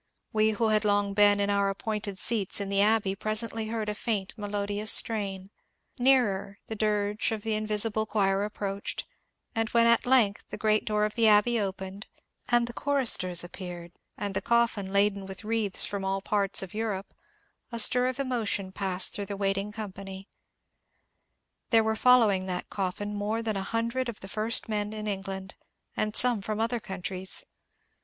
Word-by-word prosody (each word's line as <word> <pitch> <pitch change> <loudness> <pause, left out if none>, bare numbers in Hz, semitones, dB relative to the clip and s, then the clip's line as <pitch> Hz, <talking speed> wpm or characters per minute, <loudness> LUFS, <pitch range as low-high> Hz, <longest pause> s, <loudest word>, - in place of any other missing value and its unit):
We 215 0 +3
who 220 +1 0
had 215 0 +2
long 205 -1 +1
been 205 0 +5
in 200 0 +1
our 200 0 +1
appointed 205 0 -4
seats 210 -3 +1
in 200 -1 -3
the 200 0 +2
Abbey 210 -2 +2
presently 220 +2 -1
heard 220 -1 -3
a 210 - -1
&unt 205 -4 -1
melodious 205 0 -2
strain; 195 -3 0 0.5
nearer 215 -7 +2
the - - -6
dirge 210 0 0
of 215 -2 -4
the 225 -1 -1
invisible 215 0 0
choir 195 -2 +1
approached; 200 -1 -4 0.5
and 225 -2 -1
when 235 -1 +4
at 235 +1 +3
length 235 -6 +3
the - - -6
great 215 -1 +1
door 210 -1 +1
of 210 - -3
the 230 -1 +3
Abbey 215 +3 +4
opened, 195 0 -5 0.4
and 240 0 +4
the 240 - -7
choristers 235 -11 +2
ap 175 - -10
peared, 175 -2 -8 0.3
and 205 -1 -3
the - - -2
coffin 235 -5 +1
laden 200 -1 +1
with 190 +2 -9
wreaths 215 -3 -1
from 200 -1 -4
all 195 0 -1
parts 200 -1 +1
of 190 - -9
Europe, 210 -3 -4 0.6
a 235 - -4
stir 250 +3 +5
of 255 +1 -4
emotion 225 -7 -2
passed 190 -2 +1
through 200 -1 -2
the 200 0 -5
waiting 195 +1 -1
com 210 -2 -6
pany. 195 0 -9 1.4
There 225 -2 +4
were 220 0 0
following 220 -6 +4
that 180 -1 -4
coffin 200 +2 -3
more 210 +3 -2
than 220 -2 -2
a 195 - -2
hundred 230 +4 -2
of 225 - -8
the 195 - -7
first 215 +3 0
men 210 -1 -2
in 215 0 -6
England 195 -1 -5 0.4
and 215 0 -2
some 245 -4 +7
from 215 +2 -4
other 230 +2 0
countries. 190 -1 -2
210 Hz, 180 wpm, -27 LUFS, 195-225 Hz, 1.4 s, some